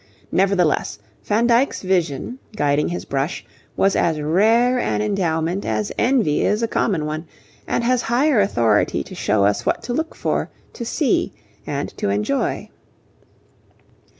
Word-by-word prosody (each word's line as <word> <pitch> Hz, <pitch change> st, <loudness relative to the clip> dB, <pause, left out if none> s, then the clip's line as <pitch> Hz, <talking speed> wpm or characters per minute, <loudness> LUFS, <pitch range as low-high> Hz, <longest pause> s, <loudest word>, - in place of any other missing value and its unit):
Nevertheless, 185 Hz, -, +1 dB, 0.3 s
Van 220 Hz, +3 st, +2 dB
Dyck's 240 Hz, +1 st, +2 dB
vision, 185 Hz, -, -1 dB, 0.2 s
guiding 145 Hz, -5 st, +1 dB
his 175 Hz, -, -4 dB
brush, 135 Hz, +4 st, -2 dB, 0.3 s
was 195 Hz, 0 st, +3 dB
as 160 Hz, -3 st, +1 dB
rare 225 Hz, +11 st, +3 dB
an -, -, 0 dB
endowment 180 Hz, -3 st, -1 dB
as 210 Hz, -, -2 dB
envy 235 Hz, -, +2 dB
is 210 Hz, +3 st, +1 dB
a -, -, +2 dB
common 185 Hz, -8 st, 0 dB
one, 155 Hz, +2 st, -4 dB, 0.4 s
and -, -, 0 dB
has 250 Hz, +1 st, +2 dB
higher 245 Hz, +1 st, +2 dB
authority 115 Hz, -, +2 dB
to -, -, -12 dB
show 100 Hz, -1 st, +1 dB
us 100 Hz, 0 st, +1 dB
what -, -, -1 dB
to 240 Hz, -, -3 dB
look 320 Hz, +5 st, -2 dB
for, -, -, -1 dB, 0.2 s
to 235 Hz, -, -6 dB
see, 265 Hz, +1 st, 0 dB, 0.3 s
and 140 Hz, 0 st, -4 dB
to -, -, 0 dB
enjoy. 105 Hz, +1 st, -1 dB
190 Hz, 145 wpm, -21 LUFS, 150-235 Hz, 0.4 s, was